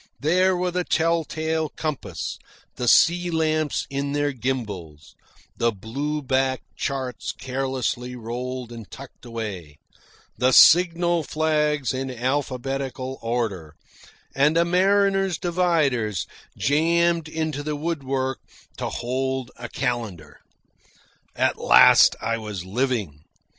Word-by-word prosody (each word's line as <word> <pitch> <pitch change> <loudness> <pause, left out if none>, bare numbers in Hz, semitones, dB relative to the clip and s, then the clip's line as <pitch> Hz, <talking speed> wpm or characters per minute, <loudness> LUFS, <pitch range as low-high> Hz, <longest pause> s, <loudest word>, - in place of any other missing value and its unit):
There 180 +5 +2
were 180 0 -1
the 180 0 -1
tell 165 0 +1
tale 160 0 -2
compass, 130 - -5 0.4
the 125 - -3
sea 175 +7 +5
lamps 155 -2 0
in 140 +1 -3
their 145 0 +1
gimbals, 105 - -5 0.4
the 115 0 +2
blue 140 +9 -4
backed 130 0 -1
charts 130 -4 -3
carelessly 130 -1 -3
rolled 125 +1 -5
and 115 -5 -10
tucked - - -12
away, 100 -10 -6 0.6
the 130 +1 +3
signal 175 +1 +6
flags 150 -4 0
in 130 +1 -3
alphabetical 130 +1 -3
order, 110 -10 -3 0.6
and 150 +4 +3
a 170 - +4
mariner's 195 +1 +2
dividers 155 - 0 0.3
jammed 165 +4 +2
into 155 -2 -3
the 150 +1 -3
woodwork 135 -4 -2 0.4
to - - -3
hold 130 +1 -3
a 120 0 -8
calendar. 110 - -4 1.0
At - - +1
last - - +7
I 115 0 -2
was 105 -5 -6
living. 105 - -2
135 Hz, 110 wpm, -24 LUFS, 120-160 Hz, 1.0 s, last